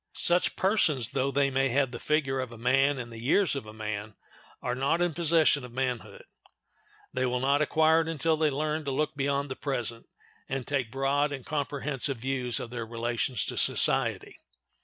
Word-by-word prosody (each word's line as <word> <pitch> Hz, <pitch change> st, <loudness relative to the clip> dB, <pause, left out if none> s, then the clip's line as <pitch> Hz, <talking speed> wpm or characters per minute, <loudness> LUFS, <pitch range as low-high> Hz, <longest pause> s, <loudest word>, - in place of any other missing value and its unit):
Such 175 Hz, +1 st, +2 dB
persons, 165 Hz, -, +2 dB
though 135 Hz, +1 st, 0 dB
they 140 Hz, 0 st, +1 dB
may 135 Hz, 0 st, +2 dB
have 135 Hz, 0 st, +1 dB
the 120 Hz, -, -6 dB
figure 140 Hz, -3 st, 0 dB
of 130 Hz, -2 st, -4 dB
a 120 Hz, -, -10 dB
man 135 Hz, +4 st, +2 dB
and 120 Hz, -2 st, -6 dB
the 115 Hz, -, -9 dB
years 160 Hz, -, +2 dB
of 135 Hz, -6 st, -5 dB
a -, -, -8 dB
man, 110 Hz, -1 st, -5 dB, 0.4 s
are 125 Hz, -, -2 dB
not 135 Hz, +6 st, +1 dB
in 175 Hz, -2 st, +1 dB
possession 160 Hz, -3 st, +3 dB
of 125 Hz, -, -9 dB
manhood; 130 Hz, -, -3 dB, 0.9 s
they -, -, 0 dB
will 125 Hz, 0 st, 0 dB
not 140 Hz, +3 st, +2 dB
acquire 160 Hz, +2 st, +4 dB
it 160 Hz, -, -4 dB
until 165 Hz, 0 st, +1 dB
they 155 Hz, -1 st, +2 dB
learn 155 Hz, +2 st, -2 dB
to 140 Hz, -, -1 dB
look 150 Hz, +3 st, -1 dB
beyond 140 Hz, 0 st, -1 dB
the -, -, -3 dB
present, 120 Hz, -5 st, -3 dB, 0.4 s
and 135 Hz, -2 st, -3 dB
take 135 Hz, -5 st, -1 dB
broad 140 Hz, +2 st, +1 dB
and 135 Hz, -3 st, -6 dB
comprehensive 145 Hz, -2 st, -1 dB
views 125 Hz, 0 st, -1 dB
of 115 Hz, -, -7 dB
their 120 Hz, -1 st, -4 dB
relations 115 Hz, 0 st, -2 dB
to -, -, -5 dB
society. -, -, +2 dB
135 Hz, 190 wpm, -28 LUFS, 125-150 Hz, 0.9 s, acquire